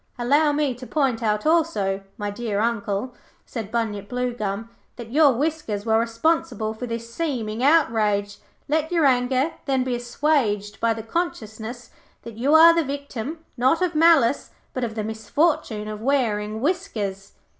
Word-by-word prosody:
'Allow 290 +5 +3
me 290 -2 0
to 250 +1 -10
point 270 -6 0
out 210 -2 0
also, 310 -13 +1 0.2
my 205 -2 -3
dear 205 -1 -3
Uncle,' 225 +1 -1 0.3
said 220 -4 -6
Bunyip 210 -4 -2
Bluegum, 230 -4 -3 0.3
'that 230 -2 -9
your 295 +1 +6
whiskers 265 -7 -2
were 220 -1 +3
responsible 230 -2 0
for 245 +3 -6
this 230 0 -6
seeming 235 -8 -2
outrage. 215 -9 +2 0.3
Let 315 +2 0
your 335 -4 +3
anger, 260 +3 +2
then, 265 -2 +1
be 255 -1 -2
assuaged 240 -4 0
by 230 -1 +1
the 225 - -6
consciousness 225 -5 -4 0.3
that 230 - -8
you 270 +7 +2
are 330 +1 +9
the 335 0 +2
victim, 280 +2 -6
not 260 +6 +3
of 355 -2 0
malice, 305 -5 +4 0.2
but 255 - -3
of 225 -2 -3
the 215 - -2
misfortune 220 +1 -1
of 215 0 -6
wearing 220 -5 0
whiskers.' 215 - -2
240 Hz, 155 wpm, -23 LUFS, 215-290 Hz, 0.3 s, are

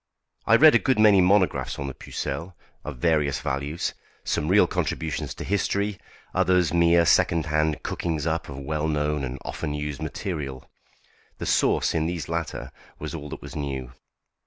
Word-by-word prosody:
I 115 - +7
read 155 +6 +8
a 120 - +6
good 130 +5 +1
many 105 -3 +6
monographs 95 +1 +2
on 70 - -4
the 70 - -4
Pucelle, 90 +7 -5 0.3
of 75 -4 -6
various 75 -2 +1
values; 70 +5 -2 0.3
some 75 - -1
real 95 +2 +5
contributions 75 -4 -3
to - - -6
history, 100 0 -1 0.3
others 90 -2 +2
mere 85 0 +4
second 85 -1 +3
hand 75 0 0
cookings 80 -4 -2
up 80 -1 -1
of 70 - -7
well 75 +3 -2
known 75 -1 0
and 65 0 -4
often 75 - -4
used 75 -1 -4
material. 75 -5 -5 0.7
The - - -5
sauce - - +2
in 80 -1 0
these 85 -1 -4
latter 85 0 -4 0.3
was - - -6
all 75 -3 -6
that - - -8
was - - -9
new. 65 -4 -4
80 Hz, 165 wpm, -25 LUFS, 75-90 Hz, 0.7 s, read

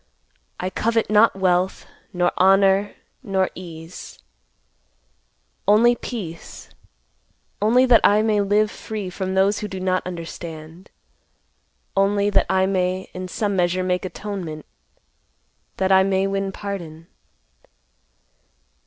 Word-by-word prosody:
I 185 +1 -3
covet 225 +2 0
not 215 0 +5
wealth, 185 -1 0 0.3
nor 175 -1 +1
honor, 195 +1 +3 0.3
nor 195 -6 0
ease; 165 -1 -10 1.5
only 225 +4 +5
peace; 185 -11 -8 0.9
only 240 +5 +4
that 245 -3 +5
I 210 +1 +4
may 215 -2 +2
live 205 +2 +2
free 210 -4 -6
from 190 +1 -3
those 195 +2 +2
who 210 - -4
do 190 -2 -6
not 185 0 0
understand; 165 0 -8 1.1
only 200 +1 +2
that - - +2
I 190 0 +3
may 185 -1 -1
in 185 0 -6
some 200 +2 -2
measure 180 0 +1
make 180 0 -1
atonement; 185 -5 -6 1.1
that 190 0 +1
I 190 0 +6
may 190 0 +1
win 195 0 -2
pardon. 175 -6 -7
190 Hz, 115 wpm, -22 LUFS, 180-205 Hz, 1.5 s, I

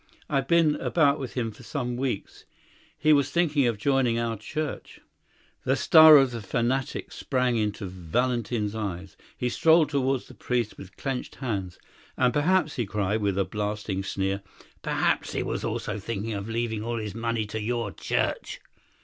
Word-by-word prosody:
"I've 135 -1 0
been 160 -2 +4
about 145 -3 +2
with 130 -3 -6
him 115 -3 -1
for 105 - -15
some 125 -1 -3
weeks. 125 -5 -4 0.5
He 155 - +4
was 140 -1 +3
thinking 150 -4 +2
of 115 -3 0
joining 130 0 +2
our 115 -1 -1
church." 150 +7 -5 0.6
The - - +2
star 155 -1 +9
of 135 -2 +4
the 115 -2 -5
fanatic 125 +5 -1
sprang 125 -3 0
into 105 -2 -1
Valentin's 105 +4 -1
eyes; 95 -4 -5 0.2
he 125 - -1
strode 160 +4 +4
towards 135 -2 0
the - - -13
priest 120 -3 -2
with 95 -1 -12
clenched 135 -2 -4
hands. 100 -9 -4 0.4
"And, 125 -1 +3
perhaps," 155 +1 +2
he 120 -4 -1
cried, 105 +2 -1
with 100 -2 0
a 100 - +2
blasting 105 -1 -3
sneer, 95 0 -2 0.4
"perhaps - - 0
he - - -1
was - - -3
also - - -3
thinking 110 +1 -4
of 100 +1 -5
leaving 115 -1 -2
all 120 +1 -2
his 105 -3 -4
money 115 0 -1
to 110 +1 -5
your 115 -1 -2
church." - - -2
115 Hz, 165 wpm, -26 LUFS, 105-135 Hz, 0.6 s, star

